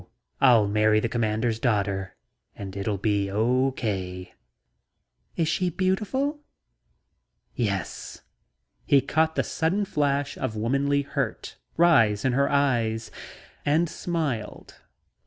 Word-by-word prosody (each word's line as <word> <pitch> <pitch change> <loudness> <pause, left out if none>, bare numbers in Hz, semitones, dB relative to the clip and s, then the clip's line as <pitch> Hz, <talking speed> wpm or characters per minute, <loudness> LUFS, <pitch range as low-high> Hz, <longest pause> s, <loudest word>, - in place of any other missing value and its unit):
I'll 120 -6 +6
marry 105 +1 +3
the 115 - -1
Commander's 110 0 -1
daughter 100 -6 -1 0.4
and 95 -1 -8
it'll 100 +2 -2
all - - -2
be 100 -1 0
okay." 105 -5 -1 1.0
"Is 165 - 0
she 180 +3 0
beautiful?" 210 - -1 1.1
"Yes." - - -4 0.6
He 140 -3 +5
caught 160 +4 +1
the - - +1
sudden 185 +6 -1
flash 145 -4 -1
of 110 - -3
womanly 140 +6 +1
hurt 140 - -4 0.2
rise 115 -11 +4
in 130 - +2
her 140 +2 +2
eyes 115 -6 0 0.5
and 155 +4 +2
smiled. 150 -11 -4
125 Hz, 110 wpm, -25 LUFS, 105-150 Hz, 1.1 s, I'll